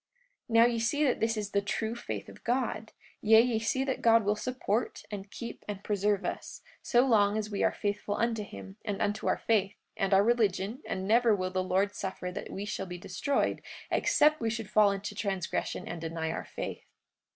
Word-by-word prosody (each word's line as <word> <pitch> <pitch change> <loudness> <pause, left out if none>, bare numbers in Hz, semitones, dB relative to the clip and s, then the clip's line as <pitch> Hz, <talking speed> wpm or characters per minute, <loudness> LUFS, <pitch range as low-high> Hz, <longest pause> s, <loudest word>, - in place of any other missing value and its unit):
44:4 230 - -1
Now 230 +1 +8
ye 235 -1 +1
see 290 +7 +1
that 265 -4 +2
this 225 0 +1
is 205 -1 -3
the 200 - +2
true 220 +2 -2
faith 240 0 -5
of - - -13
God; 240 -2 -1 0.3
yea, 220 +1 +7
ye 230 -1 +3
see 260 +4 0
that 270 -1 -2
God 230 -2 +5
will 205 +1 +2
support, 235 -1 -2
and 200 -1 -6
keep, 235 +3 -7
and 205 -1 -5
preserve 205 -1 +1
us, - - -5 0.2
so 245 +1 +3
long 210 -4 +4
as 215 0 -3
we 200 - -2
are - - +3
faithful 205 0 -2
unto 230 -1 0
him, 100 - -9
and 205 -3 -3
unto 205 +1 -1
our - - +2
faith, 205 -3 +1 0.2
and 195 0 0
our 195 0 +6
religion; 220 +1 +1
and 190 0 -3
never 230 0 +5
will 185 -1 -2
the 185 0 0
Lord 190 +2 +1
suffer 185 -1 -4
that - - -6
we 200 - -5
shall 195 -2 -4
be 180 0 -6
destroyed 190 +11 -1 0.3
except 305 -1 +3
we 225 - +1
should 225 -2 -4
fall 210 -1 +6
into 200 +1 -4
transgression 195 -4 -2
and 175 -2 -5
deny 160 0 -3
our - - -4
faith. - - -6
210 Hz, 205 wpm, -30 LUFS, 195-230 Hz, 0.3 s, Now